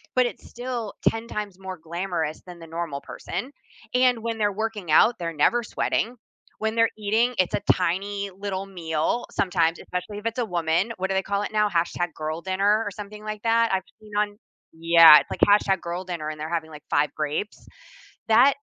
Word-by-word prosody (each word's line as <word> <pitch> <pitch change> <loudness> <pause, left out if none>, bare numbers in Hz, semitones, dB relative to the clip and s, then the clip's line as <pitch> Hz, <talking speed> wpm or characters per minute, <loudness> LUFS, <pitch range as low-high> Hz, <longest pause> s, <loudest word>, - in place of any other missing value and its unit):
but 255 -1 +4
it's - - -9
still 240 -3 -5 0.2
10 225 +1 -6
times 205 -4 -5
more 190 -1 -6
glamorous 170 -2 -3
than 180 -2 -11
the 165 - -11
normal 165 -3 -4
person, 210 +10 -6 0.4
and 250 -1 +4
when 230 0 -3
they're 210 -1 +1
working 210 -4 -3
out, 225 +9 +6
they're 170 -1 -3
never 235 +11 +2
sweating. 230 +2 -1 0.4
When 220 +1 -1
they're 230 0 +4
eating, 220 +4 +1
it's 185 - +2
a - - -2
tiny 200 +3 -2
little 195 -1 -3
meal 170 +3 -2
sometimes, 170 -3 +1
especially 195 +3 -5
if 210 - -15
it's 230 +2 -2
a 240 - +1
woman. 175 +2 0
What 190 +1 -2
do - - 0
they 190 - +1
call 200 +1 -1
it 205 - -4
now? 210 -1 +2
"#girldinner" 175 +4 0
or 205 - -3
something 210 0 -9
like 215 -1 -5
that. 230 -1 +3
I've 190 - +1 0.2
seen 215 -1 -16
on 205 0 0 0.4
Yeah. 165 -1 +8
It's - - -13
like - - -5
"#girldinner," 180 -5 +1
and 155 0 -7
they're 155 +1 -4
having, 165 -2 -2
like, 150 -1 -11
5 145 +1 +3
grapes. 155 +7 -3 0.6
That 245 +5 +6
195 Hz, 185 wpm, -25 LUFS, 170-215 Hz, 0.6 s, Yeah